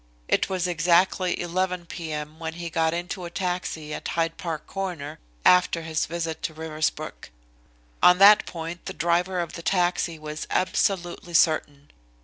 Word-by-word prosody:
It - - +2
was 185 -2 -1
exactly 180 +1 +2
11 180 0 -1
p.m. 155 -2 -6
when 160 -1 -4
he 170 0 -6
got 160 -1 +2
into 175 +2 -4
a - - -5
taxi 175 -4 -3
at - - -5
Hyde 165 -1 -1
Park 165 -3 -5
Corner 180 -7 -5 0.3
after 180 -2 +5
his 160 0 -1
visit 165 -1 -4
to 155 - -4
Riversbrook. 155 -1 -3 0.7
On 180 0 +7
that 205 +2 +7
point 165 +1 -6
the - - -4
driver 175 +2 +1
of 170 -2 -3
the - - -7
taxi 175 -2 +1
was 155 0 -6
absolutely 175 -2 0
certain. 145 -3 +2
170 Hz, 150 wpm, -25 LUFS, 160-180 Hz, 0.7 s, On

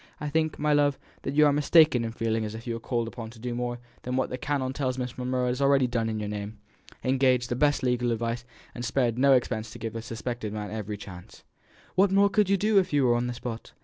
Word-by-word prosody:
I 150 - -3
think, 155 +1 0
my 150 0 +1
love, 145 -1 +3 0.3
you 150 +2 +3
are 145 - +4
mistaken 150 -3 +5
in 115 - -3
feeling 115 -1 -1
as 105 0 -5
if 115 - -9
you 120 - -2
were 115 - -4
called 115 0 -2
upon 115 -1 -7
to 115 0 -14
do 120 +1 -4
more 120 0 -2 0.2
than 125 +1 -3
what 130 - 0
the 125 - -3
canon 130 -1 -1
tells 130 -2 -2
me 130 - -1
Miss 125 +1 -6
Monro 125 0 -1
has 125 +2 -1
already 140 -1 +4
done 115 -2 -1
in 110 -1 -2
your 105 - -3
name 105 +1 -5 0.5
engaged 130 -2 +2
the 120 - -1
best 145 +1 +2
legal 125 -1 +1
advice, 115 +1 -2 0.3
and 120 - -6
spared 120 0 0
no 140 +1 +6
expense 115 -3 0
to - - -10
give 115 -1 -5
the 115 - -4
suspected 115 -1 -5
man 105 -1 -5
every 105 -1 -4
chance. 90 -3 -11 0.5
What 195 +2 +4 0.2
could 210 -3 +3
you 200 - +4
do 210 +3 0
more 215 - +4
even - - +5
if 180 - -7
you 140 -2 +3
were 120 - +4
on 120 +1 0
the 125 - -4
spot? 115 -1 -7
125 Hz, 260 wpm, -27 LUFS, 115-140 Hz, 0.5 s, no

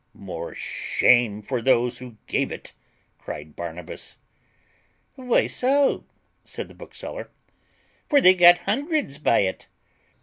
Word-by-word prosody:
"More 85 -4 -7
shame 115 -4 +2
for 125 +2 -2
those 125 0 +2
who 125 -3 -11
gave - - -1
it," - - -9 0.5
cried 75 +1 -8
Barnabas. 85 0 -7 1.0
"Why 250 -2 +1
so?" 275 +2 +1 0.4
said - - -6
the - - -14
bookseller, - - -8 0.8
"for 290 - +5
they 185 -8 +7
got 175 -1 +7
hundreds 275 - -1
by 120 -8 +3
it." 95 -1 -3
125 Hz, 115 wpm, -24 LUFS, -, 1.0 s, they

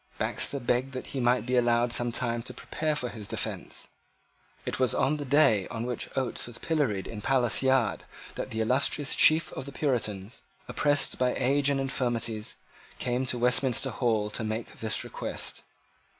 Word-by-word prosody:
Baxter 140 - 0
begged 125 +2 0
that 130 - -5
he 135 - -2
might 125 0 +2
be 125 +1 0
allowed 120 -1 +3
some 120 0 +2
time 115 0 0
to 120 - -8
prepare 155 -1 -2
for 125 -4 -2
his 105 -3 -7
defence. - - -4 0.8
It - - -3
was 130 -3 +2
on 145 +3 +2
the 145 - -5
day 125 -8 +4
on 115 0 -4
which 125 -1 -4
Oates 130 -3 -2
was 120 - -8
pilloried 135 - 0
in 105 -2 -7
Palace 125 -1 +2
Yard 130 -5 +2 0.3
that - - -5
the 110 - -2
illustrious 135 +4 +2
chief 160 +1 +5
of 130 - -6
the - - -6
Puritans, 115 -6 -2 0.3
oppressed 145 -1 +2
by 125 -1 +2
age 140 +2 +2
and 140 -1 +1
infirmities, 120 -5 -2 0.4
came 125 +1 -1
to 125 - -1
Westminster 130 +1 +2
Hall 110 -2 0
to 110 - -3
make 110 +1 -4
this 110 -1 0
request. - - -3
125 Hz, 175 wpm, -28 LUFS, 115-135 Hz, 0.8 s, chief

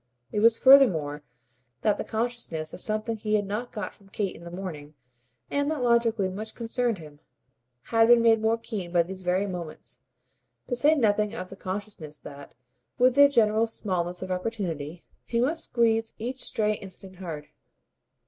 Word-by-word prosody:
It 210 - -1
was 230 +1 +5
furthermore 175 - +5 0.6
that 210 - +2
the - - -1
consciousness 220 -9 -3
of - - -8
something 215 +1 -1
he 215 0 0
had 205 -1 +1
not 215 +5 -4
got 210 -4 -5
from 195 -1 -21
Kate 195 -1 -3
in - - -13
the 170 - -8
morning, 165 -5 -7 0.6
and 285 +1 +1
that 305 -5 -2
logically 235 -4 +2
much 210 +4 -6
concerned 235 -1 -1
him, 150 -3 -13 0.6
had 225 -1 +3
been 240 -1 +6
made 225 -1 +5
more 220 +1 +2
keen 210 -6 -6
by 175 -1 +4
these 190 +2 -8
very 185 +2 +1
moments 165 -9 -7 0.6
to 245 - -2
say 295 +6 +4
nothing 210 -4 +1
of 185 -4 -6
the - - -7
consciousness 185 -6 -6
that, 140 -1 -12 0.4
with 255 0 +5
their 285 +1 +7
general 225 -3 +3
smallness 180 -5 -2
of 185 - -5
opportunity, 180 -5 -4 0.2
he 235 - 0
must 300 +7 0
squeeze 225 -1 +1
each 250 +4 -4
stray 215 -1 +1
instant 190 -1 -10
hard. 160 -5 -7
210 Hz, 170 wpm, -27 LUFS, 180-230 Hz, 0.6 s, their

